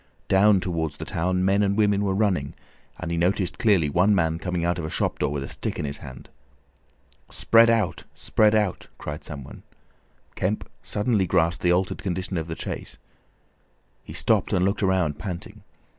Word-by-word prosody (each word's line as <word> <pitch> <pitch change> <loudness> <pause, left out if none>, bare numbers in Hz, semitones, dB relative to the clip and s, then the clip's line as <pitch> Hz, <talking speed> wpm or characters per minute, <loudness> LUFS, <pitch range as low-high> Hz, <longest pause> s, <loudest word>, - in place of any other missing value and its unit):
Down 100 +1 +5
towards 80 -5 -3
the - - -6
town, 90 +2 0
men 100 +1 +3
and 100 0 +1
women 105 -1 +3
were 95 -1 0
running, 95 -9 0 0.4
and 85 - -5
he 85 - -1
noticed 90 +1 0
clearly 100 -9 +3
one 90 +8 +3
man 80 -2 +1
coming 90 -1 -2
out 85 0 0
of 80 - -3
a - - -4
shop - - -1
door - - +1
with 70 -2 -3
a - - -6
stick - - -4
in - - -3
his 70 0 -4
hand. 65 -2 -11 1.0
"Spread 115 0 +4
out! 110 -5 0
Spread 110 0 +2
out!" 105 -4 0
cried 75 0 -6
some 70 -3 -7
one. - - -12 0.7
Kemp 100 +4 -2
suddenly 105 -3 0
grasped 85 -1 +1
the 90 - +3
altered 90 +1 0
condition 95 0 -3
of 80 -1 -3
the 80 - -4
chase. - - -6 1.1
He - - -10
stopped, - - +1
and 90 0 +2
looked 100 +2 0
round, 90 -6 +1
panting. 90 0 -7
90 Hz, 185 wpm, -24 LUFS, 80-100 Hz, 1.1 s, Down